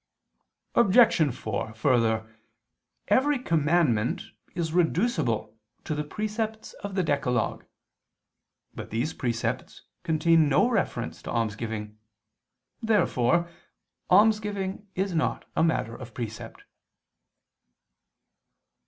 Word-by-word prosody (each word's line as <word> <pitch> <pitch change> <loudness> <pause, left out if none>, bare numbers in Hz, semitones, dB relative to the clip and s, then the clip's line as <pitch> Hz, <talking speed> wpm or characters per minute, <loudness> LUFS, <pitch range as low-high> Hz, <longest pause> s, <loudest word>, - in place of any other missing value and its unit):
Obj. 205 - +5
4: 110 -2 -4
Further, 115 -2 +2 0.8
every 275 +7 +3
commandment 155 - +1 0.3
is 165 -2 -2
reducible 160 - +1 0.3
to - - -3
the 150 0 -2
precepts 215 +5 -4
of 200 -1 -5
the 185 - +2
Decalogue. 140 -7 0 1.1
But - - -8
these 120 +8 -2
precepts 120 -3 -3 0.2
contain 160 -1 +3
no 145 - +4
reference 190 - -2
to - - -8
almsgiving. 110 -1 -3 0.8
Therefore 170 - +2 0.6
almsgiving 205 -1 +2
is 190 0 -1
not 160 - -1
a - - +3
matter 130 -8 0
of 120 -3 -10
precept. 115 -3 -7
160 Hz, 90 wpm, -27 LUFS, -, 1.1 s, Obj